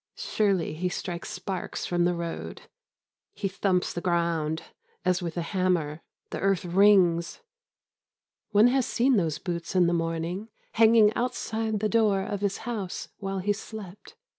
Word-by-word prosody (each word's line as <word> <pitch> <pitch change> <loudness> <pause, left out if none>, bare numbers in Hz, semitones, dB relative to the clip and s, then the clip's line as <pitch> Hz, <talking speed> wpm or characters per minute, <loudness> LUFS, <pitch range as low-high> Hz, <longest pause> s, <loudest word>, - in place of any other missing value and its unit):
Surely, 195 -7 0
he 180 +4 -2
strikes 175 -1 -5
sparks 185 0 -4
from 175 -1 +1
the 175 0 +1
road. 170 -1 -5 0.7
He 200 - -2
thumps 185 -1 0
the 175 - -4
ground 170 -3 0 0.4
as 180 0 +2
with 170 -1 -4
a 170 - 0
hammer. 170 -4 0 0.3
The - - -3
earth 195 -2 +1
rings. 180 - +4 1.1
One 210 +4 +6
has 260 -1 +1
seen 255 0 +3
those 165 -5 0
boots 170 +1 -5
in 180 -1 +5
the 170 - +2
morning 165 +5 -2 0.2
hanging 220 -1 +5
outside 225 -3 -2
the 215 - +2
door 210 -3 +2
of 200 0 -4
his 200 -1 0
house 210 -7 -4
while 195 -1 -3
he 200 +2 +1
slept. 210 - -10
185 Hz, 150 wpm, -27 LUFS, 170-210 Hz, 1.1 s, One